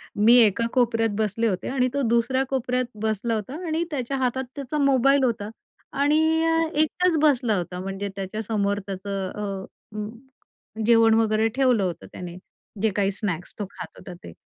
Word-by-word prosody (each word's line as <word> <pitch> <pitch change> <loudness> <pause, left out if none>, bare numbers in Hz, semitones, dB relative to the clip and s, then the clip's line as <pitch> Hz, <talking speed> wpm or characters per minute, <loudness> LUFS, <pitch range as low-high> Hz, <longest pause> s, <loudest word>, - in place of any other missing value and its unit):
मी 220 +3 +5
एका 225 +1 +3
कोपऱ्यात 230 -3 +2
बसले 220 +1 0
होते 185 -4 -2
आणि 255 -1 +1
तो 280 - 0
दुसऱ्या 250 +3 +2
कोपऱ्यात 255 -1 0 0.2
बसला 220 +1 -1
होता 220 +7 -5
आणि 320 +2 0
त्याच्या 270 -1 -2
हातात 260 0 0
त्याचा 280 +1 -4
मोबाईल 275 -1 +4
होता 220 -4 -1 0.5
आणि 295 +2 +4 0.3
अ, 325 0 +2 0.2
एकटाच 330 +2 +2
बसला 250 -8 +3
होता 180 +1 -4
म्हणजे 195 +1 -4
त्याच्या 195 +2 -4
समोर 205 -2 0
त्याचं 195 0 -4
अ, 205 +1 -7 0.9
जेवण 225 -1 +5
वगैरे 220 0 +3
ठेवलं 250 -6 +3
होतं 175 -3 -4
त्याने, 180 0 -8 0.4
जे 220 - +3
काही 200 -1 +1
स्नॅक्स 185 -4 -4
तो 205 - -2
खात - - -8
होता 180 - -9
ते 85 - -9
225 Hz, 160 wpm, -24 LUFS, 200-260 Hz, 0.9 s, मी